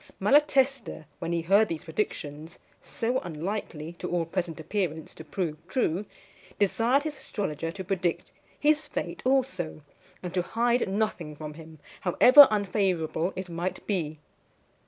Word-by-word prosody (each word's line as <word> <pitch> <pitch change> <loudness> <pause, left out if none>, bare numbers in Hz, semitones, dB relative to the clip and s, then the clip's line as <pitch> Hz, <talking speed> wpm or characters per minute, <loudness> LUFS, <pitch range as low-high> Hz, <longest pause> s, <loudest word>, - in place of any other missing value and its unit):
Malatesta, 270 - +2
when 165 - -3
he 170 -1 0
heard 200 +5 +5
these 165 -4 -4
predictions, 160 -3 -4 0.2
so 245 +3 -1
unlikely, 170 -2 -5
to 175 - -6
all 175 -2 0
present 170 -1 -3
appearance, 160 -2 -3
to - - -10
prove 155 0 -3
true, 195 -3 0 0.5
desired 230 +7 +2
his 305 -1 -4
astrologer 165 - -4
to 190 +2 -7
predict 185 -2 -2 0.3
his 305 +1 +2
fate - - -4
also, 255 - 0 0.4
and 180 -1 -5
to 180 - +2
hide 235 +4 +1
nothing 195 -7 -2
from 150 0 -7
him, 160 0 -12 0.2
however 255 +10 +8
unfavourable 185 -5 0
it 185 0 -5
might 175 +2 -4
be. 160 -7 -2
185 Hz, 135 wpm, -27 LUFS, 165-220 Hz, 0.5 s, however